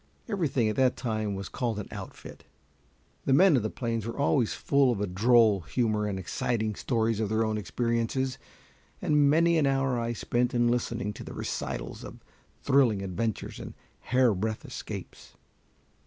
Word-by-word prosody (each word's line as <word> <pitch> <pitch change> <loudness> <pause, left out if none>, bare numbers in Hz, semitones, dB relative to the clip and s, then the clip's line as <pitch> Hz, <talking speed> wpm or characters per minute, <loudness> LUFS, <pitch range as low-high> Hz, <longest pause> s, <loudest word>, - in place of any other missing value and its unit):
Everything 160 - 0
at 105 - -1
that 130 -1 +3
time 110 -4 -2
was 95 0 -5
called 120 -4 -2
an 105 - -5
"outfit." - - -9 0.8
The 135 - +3
men 180 +2 +6
of 125 - +3
the 110 - -2
plains 115 -2 -3
were 115 - -5
always 140 -4 +2
full 140 -2 +3
of 115 - -2
a 105 - 0
droll 110 +2 +4
humor 105 +2 0
and 100 -2 -3
exciting 110 +3 -1
stories 115 0 0
of 110 -2 -1
their 110 +1 +1
own 110 0 -1
experiences, 115 +5 -1 0.6
and 145 -2 +3
many 165 +2 +4
an 145 - +3
hour 135 -2 +1
I 115 0 -2
spent 120 +2 -1
in 120 0 +3
listening 120 -2 -1
to - - -9
the - - -8
recitals - - -4
of - - -10 0.4
thrilling 120 -8 +3
adventures 95 +3 -3
and - - -8 0.2
hairbreadth 110 -4 +1
escapes. - - -8
115 Hz, 165 wpm, -28 LUFS, 110-130 Hz, 0.8 s, men